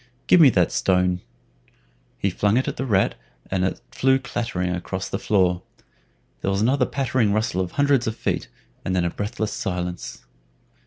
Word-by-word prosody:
Give 180 - +6
me 145 - +9
that 90 -7 +2
stone." 90 -1 +1 1.0
He 100 - 0
flung 105 +4 +2
it 130 - +1
at - - -3
the 135 - -2
rat, 100 -4 +2 0.4
and 95 -1 +1
it 95 - -1
flew 135 0 +3
clattering 105 -8 -2
across 90 -1 -4
the - - -3
floor. 90 -4 +2 0.8
There - - -1
was 95 0 +1
another 125 +3 +2
pattering 130 -6 +1
rustle 105 -4 0
of 90 - -4
hundreds 140 -4 +2
of 110 - -1
feet, - - -2 0.4
and 95 - -1
then 90 -1 +1
a 85 - 0
breathless 105 +1 -3
silence. 90 -1 -4
100 Hz, 170 wpm, -23 LUFS, 90-125 Hz, 1.0 s, me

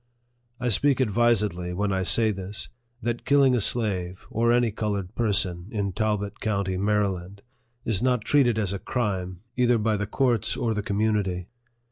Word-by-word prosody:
I 125 0 -1
speak 135 +6 +2
advisedly 105 -7 +1
when 100 +1 0
I 95 - 0
say 110 +4 +3
this, 95 +1 -6 0.3
that 120 0 -2
killing 140 -2 +4
a 120 - +1
slave, 95 -5 0
or 115 0 +2
any 120 -1 +3
colored 100 -3 -3
person, 95 -6 0
in 100 -3 -2
Talbot 105 0 -2
county, 100 -3 -1
Mary 105 +2 +2
land, 95 +1 -7 0.4
is 110 -5 0
not 125 -4 +1
treated 125 -5 +3
as 100 -3 0
a 100 - -4
crime, 95 -5 -3
either 125 -1 +3
by 110 -1 +1
the 105 0 -3
courts 120 -3 +1
or 115 -2 0
the 105 - -2
community. 100 -3 -1
105 Hz, 165 wpm, -25 LUFS, 95-120 Hz, 0.4 s, killing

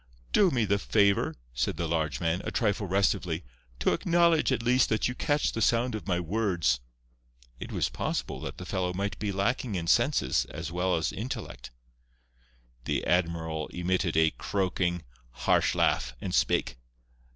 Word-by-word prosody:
"Do 200 -3 +5
me 120 -7 +1
the 100 0 +1
favour," 100 -1 +2 0.2
said 60 +5 -1
the 85 -1 -1
large 80 -5 -1
man, 85 +2 0
a - - -3
trifle 105 -3 0
restively, 90 -3 0 0.3
"to 65 - +2
acknowledge, 170 -4 +3
at 120 -3 0
least, 125 +1 +3
that 110 - +1
you 125 - -3
catch 145 +3 0
the 115 - -4
sound 120 +2 +2
of 110 - -5
my 90 -2 +1
words." 90 - 0 0.8
It - - -7
was - - 0
possible - - -3
that - - -6
the 90 - -7
fellow 90 -1 -1
might 100 0 -3
be 105 -2 -1
lacking 100 +3 -1
in 85 -2 -2
senses 120 - +2
as 80 - -6
well 90 +1 +1
as 80 - 0
intellect. 115 0 -6 1.2
The - - -1
admiral 80 -3 0
emitted 90 -2 -1
a 80 0 +4
croaking, 90 -3 -1 0.3
harsh - - +1
laugh, - - +1
and 90 - -4
spake. - - +1
95 Hz, 160 wpm, -28 LUFS, 85-115 Hz, 1.2 s, Do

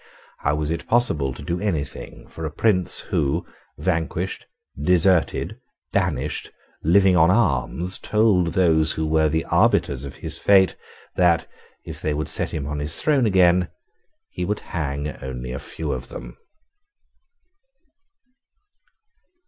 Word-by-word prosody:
How 75 +1 0
was 75 0 -2
it 85 0 -4
possible 80 - +1
to - - -9
do 85 +1 -2
any 95 -8 0
thing 70 - -10
for 80 - -9
a 80 - -2
prince 90 +3 +3
who, 75 +5 0 0.3
vanquished, 85 +1 -2 0.3
deserted, 90 +1 +2 0.3
banished, 75 -7 -1 0.3
living 95 +3 +4
on 85 -1 +5
alms, 90 - +1
told 100 -6 +2
those 80 -4 +3
who 80 - -2
were 80 0 +2
the 80 +2 -1
arbiters 70 -1 +2
of 70 - -8
his - - -6
fate 95 -2 +4 0.4
that, 85 -2 +3 0.4
if - - -8
they 75 -1 -1
would 75 +1 -3
set - - -2
him 70 - -4
on 75 +1 -4
his 75 +2 -3
throne 140 -6 +2
again, 90 -2 +4 0.6
he 90 - -4
would 105 +4 -2
hang 70 -3 -2 0.2
only 65 -1 -6
a 65 - -4
few 80 -2 -5
of 65 -1 -5
them? - - -9
80 Hz, 140 wpm, -22 LUFS, 75-90 Hz, 0.6 s, on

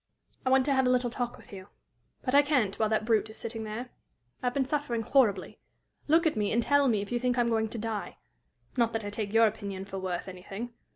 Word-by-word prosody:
"I - - +4
want 260 0 +4
to 285 - +2
have 265 -1 +3
a - - +3
little 250 -1 +2
talk 245 0 -3
with - - -16
you. 190 -1 -9 0.6
But 255 - -1
I 285 - +8
can't 260 -9 +1
while 215 -1 +2
that 220 0 +1
brute 220 -1 +2
is 220 - -10
sitting 225 -1 -5
there. 230 +4 -6 0.5
I 250 - -1
have 245 - 0
been 275 -1 +2
suffering 265 -5 -1
horribly. 215 -7 +2 0.5
Look 325 +3 +4
at 320 - +2
me, 210 -1 0
and 235 +1 +2
tell 285 +1 +4
me 215 -5 +2
if 205 - -10
you 240 - 0
think 250 0 0
I - - +4
am 235 - +1
going 220 -1 +1
to 230 - -6
die 220 -1 -4 0.6
not 235 -3 +2
that 225 -2 -2
I 205 - -4
take 205 -1 -3
your 225 +1 +6
opinion 200 -3 -3
for 195 -1 -6
worth 185 -1 -3
anything. 195 +6 -7
230 Hz, 250 wpm, -29 LUFS, 210-255 Hz, 0.6 s, I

